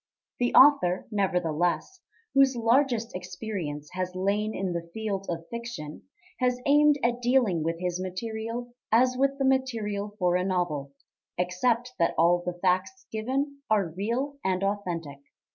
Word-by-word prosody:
The 245 0 +1
author, 260 -11 +6
nevertheless, 180 - 0 0.3
whose 270 -1 +5
largest 235 0 +2
experience 180 -5 -5
has 185 0 -3
lain 205 +3 0
in 190 -2 -2
the 170 0 -5
field 205 -3 -3
of 165 -1 -4
fiction, 235 -11 -7 0.3
has 250 -1 +1
aimed 295 +1 +5
at 240 +1 +1
dealing 240 -9 +2
with 165 +1 -2
his 180 0 -2
material 225 +5 -5 0.2
as 250 +3 +4
with 275 +1 +1
the 275 - 0
material 220 -6 0
for 180 -3 +2
a 180 - 0
novel, 175 -7 -1 0.5
except 230 +8 0
that 170 - +2
all 175 +2 +4
the 180 0 -4
facts 185 - 0
given 265 +6 -2
are 205 -5 +2
real 235 - -3
and 190 0 0
authentic. 175 -8 -3
205 Hz, 145 wpm, -27 LUFS, 180-245 Hz, 0.5 s, author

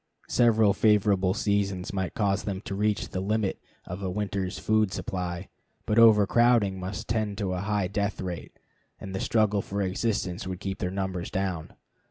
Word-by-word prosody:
Several 110 -4 +4
favorable 100 -3 +3
seasons 100 -3 -1
might 95 -2 -2
cause 100 -2 +1
them 100 -2 -3
to 100 - -6
reach 105 +1 0
the 95 - -3
limit 105 +1 -1 0.2
of 90 +3 -6
a 95 - -2
winter's 100 -1 -2
food 110 -2 +2
supply, 90 -1 -4 0.4
but 110 +1 +2
overcrowding 110 -2 +5
must 95 +2 -5
tend 110 -2 -1
to 100 -4 -1
a 90 - -2
high 100 -1 0
death 100 +1 -2
rate, 90 -2 -6 0.4
and 95 - -7
the 95 - -2
struggle 105 -3 +2
for 100 +1 -3
existence 95 -2 -2
would 90 -1 -4
keep 95 -1 -4
their 90 - -1
number 95 -1 -3
down. 95 -5 -3
100 Hz, 170 wpm, -27 LUFS, 95-105 Hz, 0.4 s, overcrowding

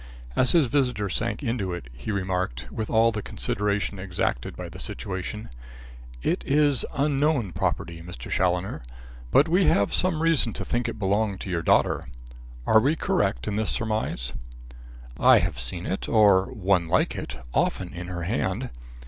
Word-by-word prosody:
As 130 - +5
his 165 -4 +5
visitor 125 -6 0
sank 115 +9 -2
into 115 -7 -1
it, 75 -8 -6
he 60 - -5
remarked, 90 -11 -2
with 110 -1 -4
all 115 0 +4
the 110 -1 -3
consideration 100 0 -1
exacted 90 -10 -2
by - - -6
the - - -10
situation: 95 +3 -4 0.7
"It - - 0
is 145 -2 +3
unknown 140 - +1
property, 85 +1 -2
Mr. 85 -7 -9
Challoner. 90 0 0 0.5
But 140 - +5
we 180 +3 +3
have 100 0 +3
some 165 -3 +1
reason 155 -9 +3
to - - -4
think 120 0 -1
it 115 - -6
belonged 100 0 0
to 95 - -5
your 85 -2 0
daughter. - - +2 0.6
Are 110 - +6
we 140 +8 +2
correct - - 0
in 105 - -1
this 110 -1 0
surmise?" 110 - -2 0.9
"I - - +7
have 85 -6 -1
seen 75 +9 -2
it, 95 - -3
or 100 -4 +5
one 95 -4 +1
like 90 +3 +1
it, - - -5 0.2
often 90 -2 0
in 90 +1 -6
her 90 -1 -4
hand." 105 +4 -2
100 Hz, 165 wpm, -25 LUFS, 90-120 Hz, 0.9 s, I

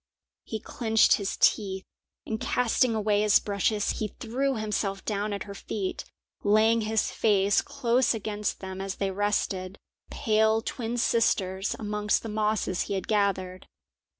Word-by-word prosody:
He 220 - -5
clenched 225 0 +3
his 200 -2 -3
teeth, 190 -3 +2 0.4
and, 220 -1 -4
casting 245 -1 +1
away 210 -1 +1
his 210 -1 +5
brushes, 205 +1 -1
he 215 - -1
threw 265 +4 -1
himself 210 -3 -2
down 210 0 -1
at 200 - -3
her 200 - -8
feet, 195 -1 -4 0.4
laying 220 +2 +4
his 220 0 0
face 200 -2 +3
close 255 -3 +1
against 210 -1 -3
them 190 0 -6
as 195 0 -4
they 195 -1 -1
rested, 195 -1 -1 0.3
pale 220 -2 +2
twin 240 -1 -3
sisters, 195 -5 +1
amongst 210 -1 -1
the 225 - -5
mosses 210 -3 0
he 200 - -1
had 190 - -4
gathered. 190 -3 0
210 Hz, 145 wpm, -27 LUFS, 195-220 Hz, 0.4 s, his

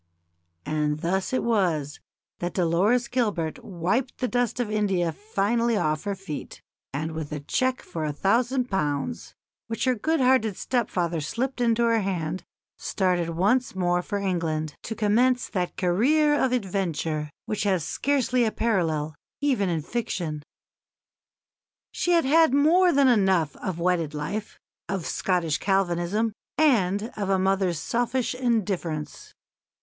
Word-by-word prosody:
And 150 0 -1
thus 185 +3 -1
it 260 - 0
was 170 -11 0 0.4
that 175 0 -3
Dolores 195 +8 +2
Gilbert 205 -11 -1
wiped 195 +8 -1
the 255 - -1
dust 245 -1 0
of 230 -4 -1
India 195 -5 +1
finally 215 +5 0
off 155 -1 0
her 200 -1 -1
feet, 190 -6 -7 0.3
and 155 +4 -3
with 160 -2 -5
a 150 - -3
cheque 255 - 0
for 160 - -5
a 150 - -1
thousand 240 - +1
pounds, 155 +6 -2 0.3
which 225 +2 -2
her 255 - +3
good 315 +8 0
hearted 250 -6 +3
stepfather 175 -9 -1
slipped 250 - -3
into 235 -1 +3
her 230 -1 +3
hand, 180 -3 -2 0.4
started 180 -3 0
once 200 +9 +1
more 175 -1 +1
for 205 - -3
England, 165 -6 -1
to 225 - -5
commence 240 +4 +2
that 180 -3 -2
career 275 - +3
of 265 -3 +2
adventure 175 -9 -1 0.2
which 215 - -2
has 190 -5 +1
scarcely 255 - +1
a 220 - +1
parallel 165 -10 0 0.3
even 255 -10 +1
in 165 -3 -1
fiction. 175 -8 -3 1.5
She 350 - 0
had 335 -4 +4
had 315 0 +5
more 345 +6 +5
than 280 -2 +4
enough 190 - +3
of 185 -3 -4
wedded 170 -3 0
life, 205 +8 -4 0.3
of 190 -4 -2
Scottish 175 -5 0
Calvinism, 195 +3 0 0.2
and 220 -7 +2
of 200 -2 -3
a 195 - +3
mother's 190 -2 +1
selfish 245 +6 -1
indifference. 200 -11 -2
195 Hz, 140 wpm, -25 LUFS, 170-240 Hz, 1.5 s, had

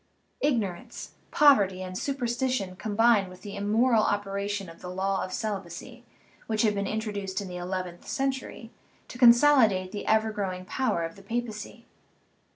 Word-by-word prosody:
Ignorance, 220 -11 -2 0.2
pov 290 -2 +7
erty, 190 -2 -1
and 185 0 -7
superstition 245 -5 -2
combined 215 -1 +2
with 180 0 -14
the 205 -1 -7
immoral 220 +3 +3
op 205 -1 0
eration 200 0 -3
of 165 0 -13
the 180 - -7
law 190 +1 -1
of 185 - -6
celibacy, 195 -6 -5 0.4
which 220 0 +1
had 215 -2 +3
been 200 -1 -2
intro 220 0 -3
duced 195 -1 -3
in 200 - -5
the 180 -1 -6
eleventh 180 -1 -5
century, 265 -4 -3 0.4
to 245 - -10
consolidate 235 -7 +5
the 205 - -6
ever 220 0 +3
growing 185 -3 -4
power 220 -7 -1
of 165 +2 -6
the - - -13
papacy. 230 +1 -5
205 Hz, 160 wpm, -27 LUFS, 190-235 Hz, 0.4 s, pov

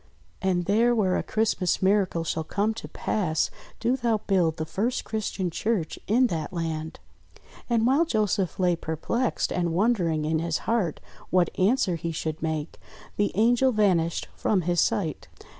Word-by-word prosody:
And 180 -2 +1
there, 230 +5 +3
where 190 -5 +2
a - - +1
Christ 220 -2 0
mas 180 - +1
miracle 190 -3 +2
shall 160 0 -2
come 205 +7 0
to 225 - -8
pass, 165 -7 -1 0.3
do 240 +3 +1
thou 235 -4 +1
build 175 -5 +2
the 160 - -2
first 210 +10 -1
Christian 205 -4 -2
church 200 -3 -1
in 245 +5 +4
that 160 -9 -2
land." 160 -2 -4 0.7
And 230 -1 +2
while 275 +7 +4
Joseph 210 - 0
lay 180 -2 +3
perplexed 165 +10 -1
and 175 -2 0
wondering 175 -7 +1
in 160 +1 +1
his 165 -1 -1
heart 220 -9 0 0.3
what 180 -2 +2
answer 190 -3 +2
he 165 +1 -3
should 155 -1 -4
make, 155 -1 -3 0.4
the 205 - +1
Angel 240 +5 +4
vanished 185 -7 +1
from 200 -4 +1
his 175 0 +1
sight. 160 -7 -1
185 Hz, 160 wpm, -26 LUFS, 165-220 Hz, 0.7 s, in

